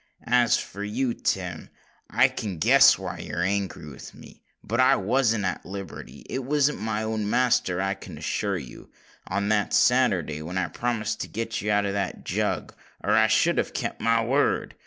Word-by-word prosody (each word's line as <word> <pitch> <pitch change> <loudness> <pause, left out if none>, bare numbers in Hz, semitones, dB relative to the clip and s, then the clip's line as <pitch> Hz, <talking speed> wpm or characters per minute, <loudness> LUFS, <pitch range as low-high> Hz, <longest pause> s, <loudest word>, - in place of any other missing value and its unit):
"As 120 -1 +4
for 100 - -6
you, 120 +4 -1
Tim—I 90 -7 -2
can 100 -5 -5
guess 80 - +6
why - - -6
you're 80 +3 -3
angry 95 -4 -2
with 75 - -11
me; - - -15 0.2
but 115 +3 -2
I 130 - +6
wasn't 115 0 +1
at 90 - -2
liberty—I 100 - -7
wasn't 145 +2 +1
my 110 0 -2
own 110 -1 -2
master, 115 -7 +2
I 95 +1 0
can 95 - -10
assure 100 -3 -2
you—on 95 +7 -7
that 105 -1 +1
Saturday 95 - +2
when 85 +4 -5
I 90 -2 0
promised 115 -3 -2
to - - -4
get 115 +1 -4
you 105 - -3
out 105 -1 +2
of 100 - -2
the 100 -2 -1
Jug; - - -2 0.3
or - - 0
I - - +5
should - - +3
have - - -2
kept - - -3
my 115 0 +2
word. 135 +5 +1
105 Hz, 175 wpm, -25 LUFS, 95-115 Hz, 0.3 s, guess